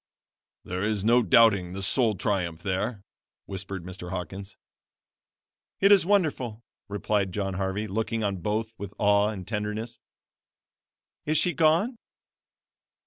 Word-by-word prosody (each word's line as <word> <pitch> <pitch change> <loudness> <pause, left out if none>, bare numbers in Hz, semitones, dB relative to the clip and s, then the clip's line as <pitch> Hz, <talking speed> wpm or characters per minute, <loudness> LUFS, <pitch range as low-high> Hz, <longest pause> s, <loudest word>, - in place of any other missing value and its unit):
"There 90 +1 -4
is 105 -2 0
no 120 +3 +5
doubting 100 -4 +4
the 95 0 -5
soul 115 +1 +2
triumph 90 -4 -2
there," 100 +2 -2 0.4
whispered 95 -1 -6
Mr. 90 0 -8
Hawkins. 95 +2 -6 1.2
"It 195 +1 +5
is 195 -4 +6
wonderful," 140 - +1 0.3
replied 100 -1 0
John 95 0 -2
Harvey, 95 +2 -2
looking 110 +2 -2
on 100 -2 -1
both 110 +5 -2
with 100 0 -7
awe 100 0 +4
and 100 -4 -5
tenderness. 110 +2 -4 1.3
"Is 155 +1 +2
she 180 - +2
gone?" 165 - +3
105 Hz, 125 wpm, -27 LUFS, 95-115 Hz, 1.3 s, is